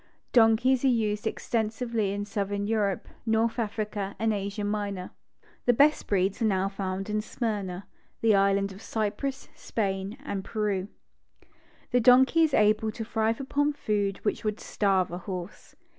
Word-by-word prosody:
Donkeys 240 +3 +4
are - - +4
used 220 -4 +1
extensively 220 -1 -1
in 205 0 -3
southern 200 0 -2
Europe, 205 -3 0 0.2
North 225 +1 +1
Africa, 210 -2 -3
and 220 +1 +1
Asia 200 +1 -3
Minor. 205 -3 -3 0.6
The 245 - +6
best 295 +4 +4
breeds 195 +1 +1
are - - +3
now 195 -2 +1
found 195 -1 -4
in 210 0 0
Smyrna, 205 -5 -3 0.4
the 225 - +2
Is - - +7
lands 195 0 +2
of 195 - -12
Cypress, 225 +6 -3
Spain 195 0 -3
and 195 -8 -3
Peru. 205 -4 -1 1.0
The 245 - +4
donkey 255 +7 +6
is 315 -4 +3
able 215 +1 +3
to 225 0 -5
thrive 225 0 0
upon 290 +2 0
food 205 -6 -1
which 210 - -1
would 215 -1 -2
starve 195 -4 +1
a 175 - -4
horse. 185 0 -7
210 Hz, 155 wpm, -27 LUFS, 200-225 Hz, 1.0 s, Is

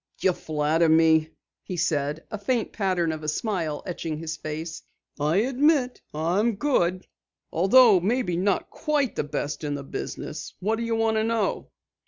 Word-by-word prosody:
"You 185 - +3
flatter 155 +1 +1
me," 160 0 +4 0.3
he 180 - -6
said, 150 -1 -1
a 215 - -4
faint 230 +2 -1
pattern 185 -5 0
of 155 -1 -5
a 155 - -6
smile 160 -2 -2
etching 165 -3 -4
his 160 0 -4
face. 155 +1 -6 0.4
"I 150 +3 +1
admit 265 +1 +2
I'm 180 +9 +1
good, 185 -8 +1 0.5
although 205 +3 +6
maybe 210 0 0
not 190 +2 0
quite 290 -6 0
the - - 0
best 145 +1 -4
in 145 -1 -2
the 140 - -6
business. 135 - -6
What 215 +4 0
do 235 - -3
you 230 0 -1
want 225 -1 +1
to 220 - +2
know?" 225 -3 -1
180 Hz, 165 wpm, -25 LUFS, 155-225 Hz, 0.5 s, although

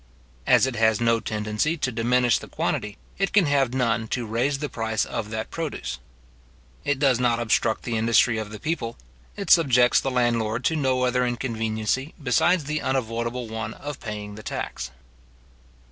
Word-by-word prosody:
As - - +6
it 130 -2 -2
has 110 -2 +3
no 115 -1 +3
tendency 105 +9 -1
to 125 - -1
diminish 120 +1 +2
the - - -10
quantity, 105 -1 -2 0.2
it 195 - +1
can 200 -3 +4
have 140 -4 +2
none 115 -3 +1
to 120 +1 -2
raise 120 +6 0
the 150 +1 -3
price 110 -4 -1
of 105 - -4
that 110 0 -4
produce. 145 - -4 0.8
It 145 -1 0
does 135 -3 +3
not 120 -2 +2
obstruct 110 -1 +1
the 115 -2 -2
industry 115 0 +3
of 110 -1 -5
the 105 0 -8
people; 155 -8 -3 0.4
it 200 - -2
subjects 125 -8 +5
the 135 - -1
landlord 120 -2 0
to 160 - +2
no 130 -4 +1
other 125 0 +2
inconveniency 115 +2 -2
besides 160 +5 +2
the 150 +1 -2
unavoidable 115 -1 -2
one 110 0 -5
of 145 -1 -7
paying 105 -2 -6
the 110 - -9
tax. - - -5
120 Hz, 170 wpm, -24 LUFS, 110-135 Hz, 0.8 s, As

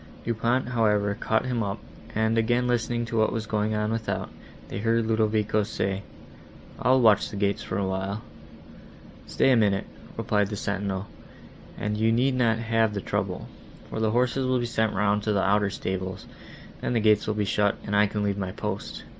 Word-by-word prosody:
Du 115 - +1
Pont, 120 +3 0
however, 105 -4 +2
caught 110 +2 0
him 125 -2 -1
up, 100 -2 -2 0.4
and, 110 +1 +2
again 120 +2 +2
listening 120 -1 0
to 115 0 -3
what 110 - +3
was 110 -1 -3
going 110 0 0
on 105 0 0
without, 115 -1 -2 0.4
they - - -5
heard 115 +1 +1
Ludovico 110 -1 +1
say, 100 -2 -2 0.8
"I'll 130 +2 +4
watch 110 -4 +4
the - - -8
gates 100 0 0
the 100 - -1
while." 95 +2 -2 1.0
"Stay 135 - +3
a - - +6
minute," 100 -4 +2 0.3
replied 105 -1 +1
the 105 - -4
sentinel, 100 -1 -2 0.7
"and 105 0 -2
you 110 +1 +3
need 125 +4 +2
not 120 -3 +2
have 115 -2 +1
the - - -1
trouble, - - -3 0.4
for - - -3
the 110 -1 +2
horses 125 +3 +1
will 130 0 +2
be 120 - -1
sent 110 -2 0
round 105 +1 +2
to 105 0 0
the 100 - +2
outer 100 +1 +3
stables, 95 -2 -4 0.6
then - - -1
the 115 - +2
gates 105 -1 +3
will 110 - 0
be 105 -1 0
shut, 105 0 +2
and 105 - -1
I 105 0 +5
can 105 0 -2
leave 100 -1 -1
my 95 -1 -3
post." 105 -1 -5
110 Hz, 190 wpm, -26 LUFS, 100-115 Hz, 1.0 s, a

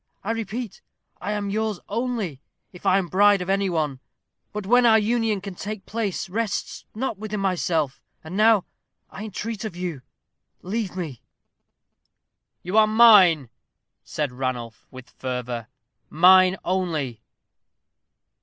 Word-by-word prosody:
I 215 - -1
repeat, 225 -1 -5 0.4
I 205 +3 -2
am 205 -1 -3
yours 215 -2 -1
only, 220 - -3 0.3
if 180 - -7
I 185 - +5
am 190 -3 -1
bride 200 +3 +4
of 180 +1 -2
any 195 0 +1
one. 150 -6 -1 0.5
But 210 -1 -5
when 245 +4 +4
our 225 -2 +6
union 220 -2 0
can 200 -1 -7
take 205 +2 -6
place 215 -4 -3
rests 210 +2 -3
not 225 -3 -3
with 215 -1 -7
myself. 175 -7 -1 0.2
And 160 +3 -8
now, 215 -2 +4 0.5
I 210 - -7
entreat 220 +1 -5
of 215 -6 -5
you, 175 -6 -4 0.6
leave 200 0 -3
me." 160 -10 -5 1.4
"You 185 +5 +2
are 215 - +5
mine," 200 - +6 0.5
said 150 -4 -3
Ranulph, 125 -4 -5
with 130 -1 -12
fervor; 125 -2 -5 0.4
"mine 185 +3 +6
only." 160 -10 -2
195 Hz, 135 wpm, -24 LUFS, 160-215 Hz, 1.4 s, our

